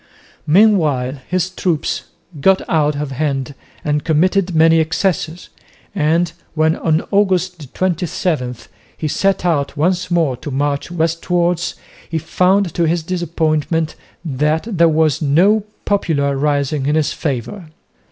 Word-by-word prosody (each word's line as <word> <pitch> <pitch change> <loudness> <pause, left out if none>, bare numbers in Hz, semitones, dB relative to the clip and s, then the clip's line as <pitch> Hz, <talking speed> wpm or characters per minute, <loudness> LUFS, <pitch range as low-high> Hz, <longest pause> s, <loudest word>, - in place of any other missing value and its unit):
Meanwhile 150 -8 +3
his 185 0 -1
troops 175 -4 -1 0.3
got 190 +6 +3
out 150 -3 +1
of 145 -1 -4
hand 135 0 -2 0.3
and 150 -1 0
committed 180 +3 +1
many 165 +1 +5
excesses, 160 +1 -1 0.4
and 165 -1 +1 0.2
when, 160 +1 +2
on 160 0 0
August 185 -7 0
27, 170 -7 -1 0.4
he 155 - -2
set 195 +4 0
out 145 -4 0
once 180 +3 0
more 165 -7 +1
to 145 - -7
march 140 +1 -1
westwards, 170 +1 0 0.3
he 165 - -1
found 185 +3 +1
to 170 - +1
his 165 0 0
disappointment 160 -2 -1 0.3
that 150 +2 0
there 170 -7 +3
was 155 -1 +2
no 190 +9 +3 0.2
popular 145 -8 +1
rising 140 0 0
in 150 - +2
his 155 -2 +1
favour. 150 - -4
160 Hz, 125 wpm, -18 LUFS, 150-180 Hz, 0.4 s, many